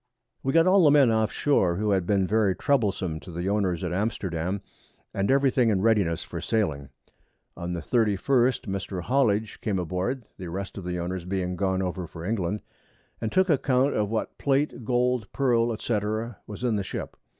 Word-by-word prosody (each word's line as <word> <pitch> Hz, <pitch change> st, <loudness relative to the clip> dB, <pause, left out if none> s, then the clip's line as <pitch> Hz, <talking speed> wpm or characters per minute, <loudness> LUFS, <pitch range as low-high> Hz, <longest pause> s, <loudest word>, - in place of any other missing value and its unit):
We 135 Hz, -, 0 dB
got 165 Hz, +3 st, +5 dB
all 185 Hz, 0 st, +5 dB
the -, -, +7 dB
Men 140 Hz, -5 st, +5 dB
off 110 Hz, -1 st, +1 dB
Shoar, 95 Hz, -12 st, +2 dB
who 105 Hz, +3 st, 0 dB
had 95 Hz, -3 st, +1 dB
been 100 Hz, -2 st, +2 dB
very 105 Hz, -1 st, +2 dB
troublesome 100 Hz, -, 0 dB
to 90 Hz, -, -11 dB
the 85 Hz, +2 st, -4 dB
Owners 95 Hz, -4 st, 0 dB
at -, -, -2 dB
Amsterdam, 95 Hz, -2 st, -2 dB, 0.5 s
and 100 Hz, 0 st, 0 dB
every 135 Hz, 0 st, +4 dB
thing 125 Hz, -3 st, +3 dB
in 100 Hz, -3 st, +1 dB
Readiness 100 Hz, -8 st, +2 dB
for -, -, -6 dB
Sailing. 75 Hz, -11 st, -1 dB, 0.7 s
On 85 Hz, 0 st, -4 dB
the 85 Hz, -, -3 dB
31st 120 Hz, -, +2 dB
Mr. 95 Hz, -2 st, -4 dB
Hollidge 110 Hz, -3 st, +1 dB
came 100 Hz, -3 st, -1 dB
aboard 95 Hz, +9 st, -2 dB
(the 90 Hz, -2 st, -6 dB
rest 95 Hz, +3 st, -5 dB
of 90 Hz, -, -9 dB
the 90 Hz, 0 st, -2 dB
Owners 90 Hz, 0 st, -4 dB
being 90 Hz, -1 st, -2 dB
gone 95 Hz, 0 st, 0 dB
over 90 Hz, -1 st, -3 dB
for 80 Hz, +1 st, -9 dB
England) 105 Hz, -1 st, -1 dB, 0.6 s
and 110 Hz, -, -2 dB
took 190 Hz, 0 st, +3 dB
Account 135 Hz, -3 st, +2 dB
of 105 Hz, -1 st, 0 dB
what 110 Hz, 0 st, -3 dB
Plate, 140 Hz, -2 st, 0 dB
Gold, 125 Hz, -1 st, 0 dB
Pearl, 120 Hz, -4 st, +2 dB
&c. 110 Hz, -1 st, 0 dB, 0.5 s
was 105 Hz, +3 st, -8 dB
in 115 Hz, -4 st, +1 dB
the 100 Hz, -, -1 dB
Ship. -, -, -6 dB
105 Hz, 185 wpm, -26 LUFS, 90-125 Hz, 0.7 s, the